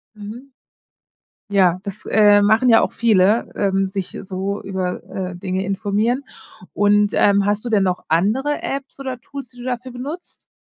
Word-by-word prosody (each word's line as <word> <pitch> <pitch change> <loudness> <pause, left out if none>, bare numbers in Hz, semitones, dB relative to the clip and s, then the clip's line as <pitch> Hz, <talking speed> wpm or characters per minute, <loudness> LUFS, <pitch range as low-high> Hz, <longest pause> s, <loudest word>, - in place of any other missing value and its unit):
Mhm. 230 +6 -10 1.0
Ja, 185 -3 +3
das, 200 0 -8
äh, 205 -1 +5
machen 220 +5 +3
ja 225 -1 +6
auch - - 0
viele, 215 -1 +3
ähm, 195 -1 +1
sich 190 -1 -5
so 195 +1 -4
über, 185 -2 -3
äh, 185 -2 -5
Dinge 185 +1 -3
informieren. 210 +6 0 0.5
Und, 205 0 +3
ähm, 200 -1 +3
hast 205 +1 0
du 245 - -4
denn 210 -4 +3
noch 180 -1 -1
andere 220 - +1
Apps 275 0 -5
oder 260 -2 -4
Tools, 275 -1 -9
die 245 - -21
du - - -8
dafür 250 0 -4
benutzt? 290 +8 -8
205 Hz, 165 wpm, -20 LUFS, 195-245 Hz, 1.0 s, ja